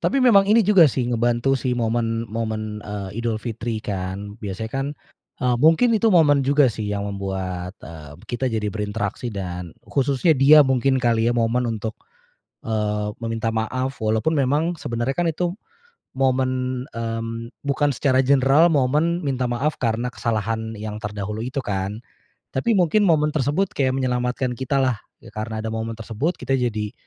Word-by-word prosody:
Tapi 275 - +1
memang 200 -6 +6
ini 225 +2 +6
juga 195 -5 +6
sih, 130 -2 0
ngebantu 120 +2 +1
sih 125 -1 -1
momen 115 -1 0
momen, 110 -1 -3
eee, 105 0 -6
Idul 115 -1 -1
Fitri 115 -1 -4
kan. 100 +2 -5
Biasanya 105 +2 -5
kan, 135 +2 -2 0.6
eee, 125 -1 +2
mungkin 165 - +5
itu 225 0 +3
momen 145 -4 +5
juga 140 -2 +4
sih 110 -1 -5
yang 100 -1 -2
membuat, 95 -2 -4
eee, 75 -3 -10
kita 120 +2 -3
jadi 110 -3 -2
berinteraksi, 105 +2 -3
dan 90 -5 -6
khususnya 140 +4 +2
dia 150 +2 +7
mungkin 130 0 +2
kali 115 -2 +2
ya 120 - +1
momen 120 +2 +1
untuk, 110 +1 -5 0.7
eee, 105 -1 -1
meminta 115 0 -2
maaf. 130 +4 -2
Walaupun 110 +8 +1
memang 150 +5 +1
sebenarnya 120 +3 -2
kan 175 +2 0
itu 175 +2 -2 0.7
momen, 130 -1 0
mmm, 115 0 -4
bukan 145 +1 +1
secara 130 0 +2
general, 140 +4 +5
momen 150 +6 +2
minta 130 -3 -1
maaf 135 +6 -1
karena 115 0 0
kesalahan 110 -1 -2
yang 105 0 -5
terdahulu 105 0 -5
itu 135 +2 -3
kan. 100 +2 -3 0.5
Tapi 135 - +1
mungkin 180 +3 +3
momen 155 -4 +3
tersebut 150 +7 +1
kayak 130 -2 +1
menyelamatkan 125 0 -1
kita 130 +2 -1
lah. 130 -4 +1 0.2
Ya, 115 - -13
karena 110 +1 -4
ada 110 - -3
momen 115 0 -3
tersebut 115 - -2
kita 125 +2 -2
jadi 110 -4 -2
120 Hz, 160 wpm, -22 LUFS, 110-135 Hz, 0.7 s, dia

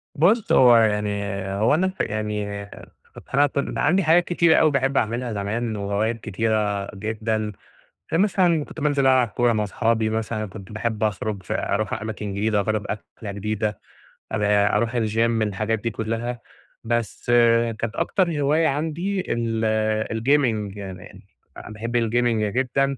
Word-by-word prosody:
بُصّ، 200 +9 +3
هو 125 -2 +7
يعني 105 -2 +1 0.3
هو 105 +7 +2
أنا 185 +5 +2
ف 190 - -7
يعني 105 -1 -2 0.9
أنا 145 +2 +5
أصلًا 140 0 -2
عندي 180 +5 +3
حاجات 165 +3 +5
كتيرة 170 -2 +3
أوي 155 -2 +4
باحب 135 0 +1
أعملها 120 +1 -1
زمان 110 +3 -2
وهوايات 105 +3 -1
كتيرة 105 -1 -1
جدًا، 110 +1 -2 0.6
فمثلًا 175 -4 +2
كنت 160 - -10
بانزل 145 -2 +2
ألعب 130 -2 +4
كورة 120 +2 +1
مع 105 -1 0
صحابي 110 0 0
مثلًا، 110 0 -2
كنت 100 0 -11
باحب 110 0 -2
أخرج 105 -1 -2
ف - - -9
أرُوح 105 0 -1
أماكن 110 -2 -4
جديدة، 105 +1 +1
أجرب 105 0 -1
أكلة 105 0 -6
جديدة، 105 +1 -3 0.5
أل 105 - 0
أرُوح 105 +3 +2
الجيم، 115 0 +1
الحاجات 110 +1 -1
دي 115 - -2
كلها، 115 +2 -3 0.4
بس 115 -3 -2 0.5
كانت 115 -1 -3
أكتر 170 -7 0
هواية 155 +3 +3
عندي 165 +7 -1
ال 115 -1 -1 0.5
الgaming 115 -6 +1
يعني 95 -2 -9 0.5
باحب 115 +3 -3
الgaming 115 -2 +1
جدًا، 135 +1 +1
110 Hz, 140 wpm, -23 LUFS, 105-135 Hz, 0.9 s, هو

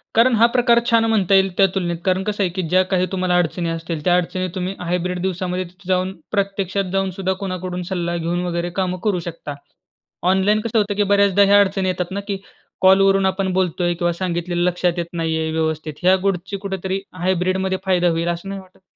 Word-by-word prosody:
कारण 235 +2 +5
हा 225 +1 +5
प्रकार 240 -1 +4
छान 230 -1 +4
म्हणता 200 -4 +2
येईल 195 0 +4
त्या 195 - +6
तुलनेत 175 -3 -1
कारण 185 0 +1
कसं 205 0 -1
आहे 180 - +1
की 185 - 0
ज्या 185 +2 +4
काही 185 0 +3
तुम्हाला 185 -1 0
अडचणी 170 0 0
असतील, 165 -2 -4
त्या 175 -1 +4
अडचणी 185 +1 -2
तुम्ही 185 +1 -3
हायब्रिड 180 +1 -2
दिवसामध्ये 185 0 -2
तिथे 180 +2 -17
जाऊन 185 0 +1 0.2
प्रत्यक्षात 195 -2 -1
जाऊन 195 -1 0
सुद्धा 190 -1 0
कोणाकडून 185 -1 -4
सल्ला 175 -2 -1
घेऊन 170 +1 -1
वगैरे 170 0 -2
कामं 185 -1 -2
करू 205 -4 +1
शकता. 150 -3 -6 0.8
ऑनलाईन 200 +3 +3
कसं 230 0 -1
होतं 205 -1 0
की 205 - +2
बऱ्याचदा 200 0 +4
ह्या 200 +1 +6
अडचणी 195 -1 0
येतात 180 0 -3
ना 200 - -2
की 200 -1 -2 0.4
कॉलवरून 195 +1 +5
आपण 190 0 0
बोलतोय 180 -1 0
किंवा 175 0 0
सांगितलेलं 175 0 -2
लक्षात 180 -1 0
येत 170 - -1
नाहीये 160 -1 -1
व्यवस्थित. 160 -1 -2
ह्या 185 +1 +6
गोष्टी 190 +1 -2
कुठेतरी 190 -1 -3 0.2
हायब्रिड 185 +1 +1
मध्ये 190 0 -1
फायदा 180 -2 +3
होईल, 165 +1 -1
असं 175 +3 -4
नाही 195 -1 -5
वाटत? 185 0 -22
185 Hz, 200 wpm, -20 LUFS, 175-195 Hz, 0.8 s, त्या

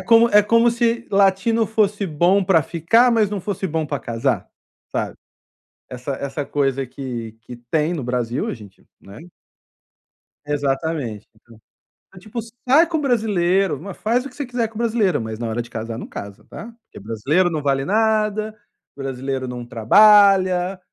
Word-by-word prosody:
como 230 0 +5
é 210 -1 +6
como 230 +3 +3
se 235 0 0
latino 200 +3 +2
fosse 205 -2 0
bom 175 +5 +2
para 180 -3 +4
ficar, 205 - +3
mas 220 -3 +2
não 205 -2 -3
fosse 190 0 -3
bom 160 -2 -2
para 145 -1 -4
casar, 115 -1 -2 0.4
sabe. - - -3 0.7
Essa 125 +2 -5
essa 140 +2 -4
coisa 135 -1 -1
que 120 -3 -6
que 125 +2 -10
tem 150 +7 -1
no 145 -6 -4
Brasil. 125 +1 -2
A - - -3
gente 105 -5 -16
né? 100 +1 -13 1.3
Exatamente. 140 -5 -2
Tipo 115 0 -20 0.5
é - - -15
tipo 215 +5 -7
asim: 230 0 -8 0.2
"Sai 310 +6 +5
com 325 -2 -1
brasileiro, 195 - +1
m 190 +7 -8
faz 240 +7 -1
o - - -6
que 250 - -20
você 285 - -4
quiser 240 -2 -2
com 225 - -12
brasileiro, 225 -5 +1
mas 110 -1 -5
na 120 - -3
hora 115 +2 -2
de 120 - -11
casar, 115 0 -5
não - - -7
casa, 100 0 -9
tá?". 225 - -9 0.2
"Porque - - -13
brasileiro 135 - 0
não 155 -3 -3
vale 135 -1 0
nada. 215 +1 0 0.4
Brasileiro 135 -1 -4
não 125 -1 -6
trabalha", 185 - +4
175 Hz, 170 wpm, -21 LUFS, 130-215 Hz, 1.3 s, é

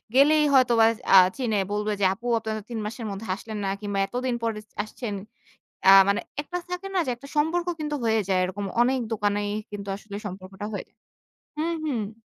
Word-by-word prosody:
গেলেই 300 +2 +6
হয়তো 255 -3 +5
বা - - +8 0.3
আ - - +11 0.2
চিনে 230 -5 0
বলবে 210 +1 -1
যে - - +4
"আপু, 225 +5 -13
আপনারা 220 -1 -4
৩ 230 -2 -4
মাসের 225 +2 -5
মধ্যে 200 +3 -6
আসলেন 215 +1 -7
না - - 0
কিংবা 205 -1 -2
এতদিন 250 0 -2
পরে 225 -2 -1 0.2
আসছেন।" 215 0 -6 0.8
আ - - +11 0.2
মানে 200 - +2 0.2
একটা 355 +5 -5
থাকে 360 +2 -4
না 375 - +2
যে - - 0
একটা 280 +3 -12
সম্পর্ক 330 +4 +1
কিন্তু 300 -1 -2
হয়ে 220 -1 +3
যায়, 190 - +2
এরকম 190 +2 -4 0.2
অনেক 260 +1 +2
দোকানেই 205 -1 0 0.2
কিন্তু 200 -1 -7
আসলে 205 0 -9
সম্পর্কটা 190 +1 -7
হয়ে 205 - -4
যায় - - -40 0.6
হুম, 330 +2 -1
হুম। 225 -6 -3
220 Hz, 190 wpm, -25 LUFS, 205-265 Hz, 0.8 s, আ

